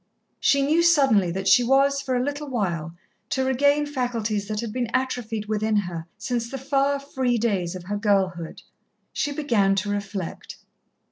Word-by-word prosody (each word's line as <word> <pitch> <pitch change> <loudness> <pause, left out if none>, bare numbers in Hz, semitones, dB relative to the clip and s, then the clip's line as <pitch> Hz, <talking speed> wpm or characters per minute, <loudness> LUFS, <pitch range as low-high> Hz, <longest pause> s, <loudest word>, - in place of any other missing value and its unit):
She 280 0 +3
knew 310 +4 +3
suddenly 270 - +4
that 190 +3 -3
she 245 - +6
was, 275 +2 +3
for 260 -2 -2
a 250 - +1
little 285 +1 -4
while, 170 -9 -2 0.3
to 265 0 0
regain 285 +3 +3
faculties 230 -7 -2
that 215 -1 -3
had 230 -3 -5
been 245 -2 -2
atrophied 240 -4 -2
within 215 0 0
her 175 -5 -2
since 235 +2 -3
the 270 - -5
far, 275 +1 +1
free 260 -3 -1
days 195 -6 -1
of 180 - -7
her 205 +3 -3
girlhood. 190 -5 0 0.5
She 290 - -1
began 230 -10 +2
to 200 +1 -1
reflect. 200 -3 -5
235 Hz, 165 wpm, -24 LUFS, 200-275 Hz, 0.5 s, she